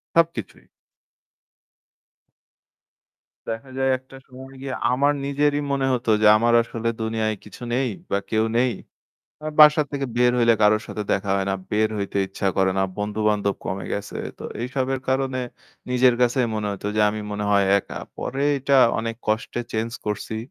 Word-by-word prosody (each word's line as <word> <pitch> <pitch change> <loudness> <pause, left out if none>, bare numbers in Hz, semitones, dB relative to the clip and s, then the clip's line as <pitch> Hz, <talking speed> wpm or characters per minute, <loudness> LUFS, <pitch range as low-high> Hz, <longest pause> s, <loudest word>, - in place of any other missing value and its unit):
সবকিছুই। 165 - 0 2.8
দেখা 115 +4 -5
যায় 135 0 +2
একটা 130 +1 -16
সময় 130 +1 -12
গিয়ে 135 -1 -4 0.2
আমার 140 +3 +3
নিজেরই 145 +1 +1
মনে 135 -1 +1
হতো 120 -2 -1
যে - - +5
আমার 120 +2 +2
আসলে 115 0 -4
দুনিয়ায় 110 -1 -1
কিছু 105 - -13
নেই 130 +1 +1 0.2
বা 100 - +2
কেউ 110 0 +2
নেই। 125 +1 +3 0.7
এ - - -3
বাসা 150 0 +8
থেকে 140 -1 -2
বের 125 0 +4
হইলে 115 -1 +5
কারো 105 +1 +6
সাথে 105 - -4
দেখা 100 0 -1
হয় 95 -1 -1
না, - - +1 0.2
বের 110 +1 +2
হইতে 100 0 -2
ইচ্ছা 95 0 -2
করে 95 0 +3
না, - - +3
বন্ধু-বান্ধব 105 -1 0
কমে 95 +1 -3
গেছে। 100 0 -4 0.2
তো - - -9 0.2
এইসবের 130 +1 -2
কারণে 130 -1 0 0.5
নিজের 125 0 +4
কাছেই 125 0 +3
মনে 105 -1 -2
হতো 100 +1 -6
যে - - +3
আমি 105 0 -5
মনে 105 0 -3
হয় 100 -1 +4
একা। - - -7 0.2
পরে 135 +2 -3 0.2
এটা 135 +1 +2 0.2
অনেক 115 0 -2
কষ্টে 110 +2 -1
চেঞ্জ 110 +1 -1 0.2
করছি। 105 +1 -3
115 Hz, 160 wpm, -23 LUFS, 105-130 Hz, 2.8 s, বাসা